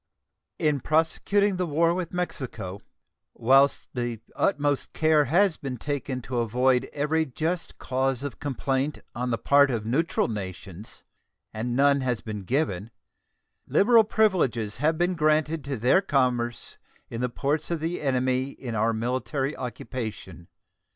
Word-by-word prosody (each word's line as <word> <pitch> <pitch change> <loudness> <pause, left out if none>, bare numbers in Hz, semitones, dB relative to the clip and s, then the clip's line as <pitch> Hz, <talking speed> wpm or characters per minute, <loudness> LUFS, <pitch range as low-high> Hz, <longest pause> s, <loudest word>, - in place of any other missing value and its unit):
In 150 -2 +1
prosecuting 185 - +1
the 180 -1 -1
war 165 +2 +2
with 175 -2 -3
Mexico, 130 - -4 0.5
whilst 135 +4 +3
the 120 -2 -3 0.2
utmost 145 -6 0
care 155 -2 +3
has 175 +5 +3
been 135 -3 -5
taken 135 -1 -3
to 125 0 -2
avoid 125 +2 +2
every 150 +2 +1
just 160 +5 -3
cause 130 0 -1
of 140 -5 -6
complaint 135 +1 -2
on 125 +1 -3
the 115 - 0
part 140 +2 +4
of 115 -4 -2
neutral 145 +9 +1
nations, 95 -1 -7 0.5
and 120 +3 -3
none 140 +1 +4
has 125 -3 -1
been 105 -3 -6
given, 115 - -1 0.8
liberal 225 +2 +5
privileges 175 - +1
have 155 +5 +1
been 175 +2 +1
granted 155 -1 +1
to 140 -2 -3
their 125 - +4
commerce 125 -8 -1 0.3
in 115 - -4
the 125 - 0
ports 145 +5 -1
of 170 -2 -1
the 165 +3 -3
enemy 130 -1 0
in 130 -3 -7
our 110 +1 +1
military 125 +4 -2
occupation. 110 -7 -6
135 Hz, 140 wpm, -26 LUFS, 120-155 Hz, 0.8 s, liberal